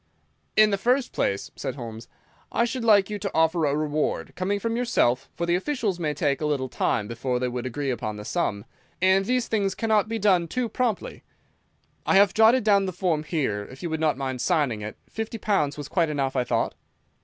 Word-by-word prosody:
"In 215 -1 +6
the 200 - 0
first 250 +5 +1
place," 100 0 -1
said 130 - -4
Holmes, 115 -3 -8 0.4
"I 235 - +2
should 240 +1 -3
like 210 -3 +4
you 210 - -3
to - - -2
offer 160 0 +3
a 140 - +1
reward—coming 155 +6 -1
from 230 +2 -2
yourself, 135 - +1
for 170 - -2
the 170 - +1
officials 200 -2 -1
may 150 -3 -1
take 140 0 0
a 150 - 0
little 135 -3 -1
time 105 -2 0
before 125 +2 -2
they 125 0 -1
would 125 0 -3
agree 140 +2 -2
upon 110 -3 -3
the 105 0 -8
sum, 105 -12 -1 0.3
and 190 +1 +4
these 250 +1 0
things 200 -3 0
cannot 220 -2 +1
be 225 - -1
done 190 -5 +3
too 250 +6 -1
promptly. 240 -4 -2 0.8
I - - +2
have 195 -1 +6
jotted 225 +3 +5
down 200 -2 +3
the - - -2
form 165 -4 0
here, 135 - -2
if 130 +5 -12
you 170 - -3
would 160 - -1
not 155 -3 +1
mind 130 -2 -3
signing 145 - +1
it. 105 +1 -6
Fifty 225 +1 -5
pounds 190 -11 0
was 145 -1 -6
quite 165 0 +1
enough, 140 -3 -1
I 125 -1 +1
thought." - - 0
170 Hz, 210 wpm, -25 LUFS, 135-210 Hz, 0.8 s, In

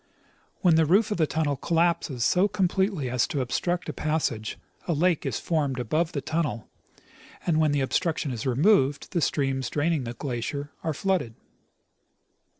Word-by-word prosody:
When 170 -3 +5
the 160 - +4
roof 200 +7 +3
of 210 - 0
the 160 -3 +2
tunnel 150 -2 0
collapses 165 -6 0
so 185 +3 +4
completely 190 -5 0
as 125 -1 +1
to 145 - -2
obstruct 175 +8 -1
the - - -4
passage, 145 -9 -2 0.3
a 170 - +1
lake 170 +2 +1
is - - -2
formed 145 -6 -1
above 155 +8 0
the 140 - -2
tunnel, 145 -6 -2 0.8
and 160 -3 +2
when 155 -2 +3
the 145 -1 +1
obstruction 150 +1 0
is 120 +1 -4
removed 140 - +2
the 170 - 0
streams 135 -4 0
draining 150 -2 0
the 120 - -4
glacier 140 +4 -4
are 160 -2 -1
flooded. 180 -11 -1
155 Hz, 160 wpm, -26 LUFS, 135-170 Hz, 0.8 s, When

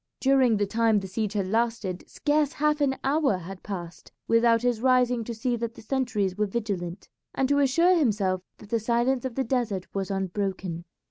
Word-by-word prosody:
During 260 -4 +4
the 205 - +1
time 220 +1 +2
the 195 - -7
siege 210 +2 -2
had 200 -3 0
lasted 220 -3 -1
scarce 295 -1 +1
half 300 0 +1
an 270 -2 +2
hour 275 -5 +2
had 185 +2 -9
passed 175 -4 -7 0.2
without 230 0 +4
his 245 -3 +1
rising 250 -2 +3
to 235 - -5
see 240 +2 -1
that 235 0 -4
the - - -12
sentries 220 -7 -1
were 210 +1 0
vigilant, 195 -4 -4 0.3
and 265 - +1
to 285 0 +3
assure 335 +7 +4
himself 205 - +1 0.2
that 210 - -14
the 230 - +2
silence 240 +3 +1
of 255 -3 -4
the 270 - 0
desert 225 -7 -1
was 195 -1 -2
unbroken. 190 -3 -3
230 Hz, 190 wpm, -26 LUFS, 195-260 Hz, 0.3 s, During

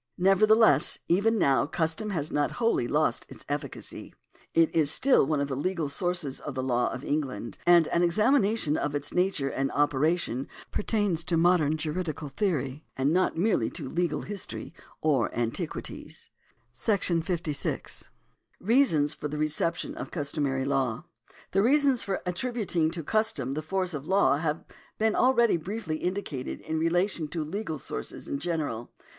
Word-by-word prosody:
Nevertheless 195 - +5
even 210 +6 +3
now 140 -7 +3
custom 160 +7 -1
has 160 -6 -2
not 145 0 0
wholly 230 - +1
lost 150 +4 0
its - - -11
efficacy. 145 -1 -5 0.4
It 165 -1 +4
is 155 -3 +3
still 255 - +4
one 155 -1 +1
of 140 - 0
the 135 - -3
legal 165 +1 -1
sources 155 -3 -1
of 150 - -7
the 130 - -2
law 125 -1 +1
of 130 - -6
England, 135 -7 -3
and 170 -2 +6
an 170 - +1
examination 210 - +2
of 145 0 -2
its 145 0 -3
nature 180 -6 +1
and 135 0 -1
operation 145 -2 +1 0.2
pertains 205 -6 0
to 170 - +1
modern 160 -3 +3
juridical 155 -1 -3
theory, 145 -5 -2
and 135 +3 +2
not 185 -2 +1
merely 175 - +2
to - - -5
legal 170 +2 -1
history 205 -4 -5 0.3
or 140 -7 +2
antiquities. 115 -1 -4 0.4
§ 175 - +1
50. 160 -4 -3 0.5
Reasons 185 - +3
for - - -5
the 150 +1 -5
Reception 165 - -1
of 320 - -6
Customary 140 -4 -2
Law. 135 -2 0 0.5
The 195 - +3
reasons 275 +1 +4
for 195 -1 -3
attributing 180 -4 0
to 165 0 -4
custom 160 - 0
the 150 +3 -2
force 185 +2 -2
of 145 0 -6
law 190 -7 +3
have 155 0 -2 0.3
been 220 0 +2
alreadj'^ 235 -10 +3
briefly 190 -4 -3
indicated 175 -8 -3
in 160 0 -3
relation 170 0 +1
to 160 +1 -3
legal 165 0 -4
sources 65 - -6
in 140 - -3
general. 150 -9 -3
160 Hz, 155 wpm, -28 LUFS, 145-190 Hz, 0.5 s, and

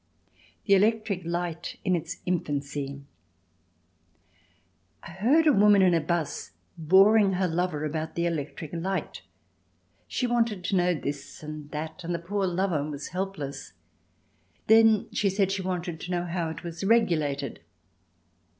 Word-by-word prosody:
The 200 - +4
Electric 210 -1 +2
Light 170 -1 -3
in 185 -2 +3
its 165 +1 -5
Infancy 140 -5 -3 2.0
I 170 - -9
heard 245 - +3
a 300 - +6
woman 205 -2 +6
in 180 -2 +5
a 165 - +3
'bus 170 -1 -3 0.2
boring 195 +5 +5
her 185 0 +1
lover 165 -3 -1
about 155 +1 -4
the 170 - 0
electric 155 -1 -4
light. 185 +3 -3 0.9
She 255 - -1
wanted 230 -5 0
to 195 - 0
know 180 -1 +2
this 145 0 -6
and 150 -1 -7
that, 155 +3 -6
and 170 +1 -2
the - - 0
poor 190 +4 -2
lover 180 -4 0
was 150 -1 -6
helpless. 180 -6 -5 0.9
Then 220 -1 +5
she 200 - +1
said 195 0 +1
she 195 0 -1
wanted 175 -3 -3
to - - -7
know 175 -1 -1
how 170 -1 -2
it 160 +1 -7
was 170 0 -6
regulated. 155 -10 +1
175 Hz, 140 wpm, -27 LUFS, 155-195 Hz, 2.0 s, a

